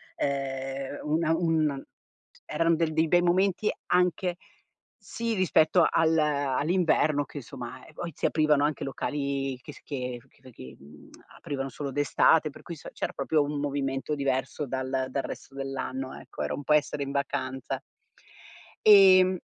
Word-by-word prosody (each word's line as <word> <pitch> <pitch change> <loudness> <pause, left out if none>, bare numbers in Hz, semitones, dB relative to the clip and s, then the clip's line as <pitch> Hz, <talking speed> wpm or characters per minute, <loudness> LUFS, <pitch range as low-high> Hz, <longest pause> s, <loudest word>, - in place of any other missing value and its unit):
ehm, 135 0 -3
una 160 +1 +1
un 160 -5 0 0.6
eran 165 +2 +1
de 165 -1 +1
dei 160 +1 +2
bei 175 0 +5
momenti 185 +3 +2 0.2
anche 180 0 +1 0.6
sì 230 0 -4
rispetto 175 -3 +4
al 165 0 +3
all'inverno 150 +1 +1
che 145 - -11
insomma, 125 -1 -8
e - - -15
poi 170 -1 -5
si - - -3
aprivano 150 -2 +3
anche 150 0 -1
locali 140 -1 -2
che 145 - -10
s - - -16
che 125 -4 -4
che 130 +1 -17
che, 65 - -11
mhmm, 75 +2 -16 0.3
aprivano 135 -2 -4
solo 140 +1 -5
d'estate, 145 +2 +3
per - - -14
cui 170 - -8
s - - -12
c'era - - -3
proprio 145 +2 +1
un 145 0 -3
movimento 140 0 -2
diverso 135 +1 -1
dal 130 0 -2
dal 135 +1 -2
resto 135 - -8
dell'anno, 135 -1 -4
ecco. - - -9
Era - - -2
un 145 - -5
po' 150 - -2
essere 150 -1 +1
in 140 - -5
vacanza. 135 -2 -3 1.0
Ehm 185 -3 +7
145 Hz, 155 wpm, -27 LUFS, 135-165 Hz, 1.0 s, Ehm